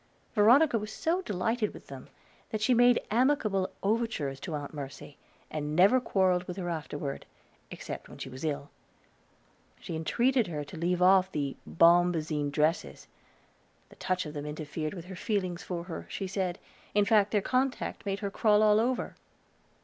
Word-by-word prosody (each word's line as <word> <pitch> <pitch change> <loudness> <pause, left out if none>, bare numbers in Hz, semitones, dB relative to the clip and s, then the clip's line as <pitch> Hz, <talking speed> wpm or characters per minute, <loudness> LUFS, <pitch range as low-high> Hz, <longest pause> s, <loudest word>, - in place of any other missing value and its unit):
Veronica 235 +4 +5
was 210 +1 -6
so 335 +10 0
delighted 220 - -1
with - - -12
them - - -10 0.4
that 215 - -3
she 220 +4 +3
made 245 0 +5
amicable 220 -6 +2
overtures 200 - -1
to 165 0 -5
Aunt 145 0 -6
Mercy, 140 0 -8 0.4
and 150 0 -3
never 200 +9 +5
quarreled 185 -5 +1
with 180 +1 -6
her 175 -2 -3
afterward, 145 -3 -5 0.4
except - - -7
when - - -11
she - - -6
was 130 +2 -9
ill. 145 -2 -3 1.1
She 165 - -6
entreated 235 +9 +1
her 150 -4 -4
to 160 - -11
leave 175 +2 0
off 190 0 +5
her 140 -2 -1
bombazine 165 -3 +3
dresses; 155 +4 -1 0.8
the - - -16
touch 185 -1 -2
of 150 - -7
them 145 -1 -5
interfered 155 +2 -4
with 175 -2 -8
her 190 +1 -8
feelings 185 -3 -2
for 175 -2 -4
her, 175 -1 -7
she 195 - -4
said; 185 -1 -2 0.4
in 205 -1 +4
fact, 210 -2 +4
their 210 - +2
contact 255 +1 -1
made 200 0 -3
her 200 -1 -3
crawl 210 0 +3
all 210 0 +5
over. 245 +2 -1
185 Hz, 165 wpm, -29 LUFS, 155-215 Hz, 1.1 s, Veronica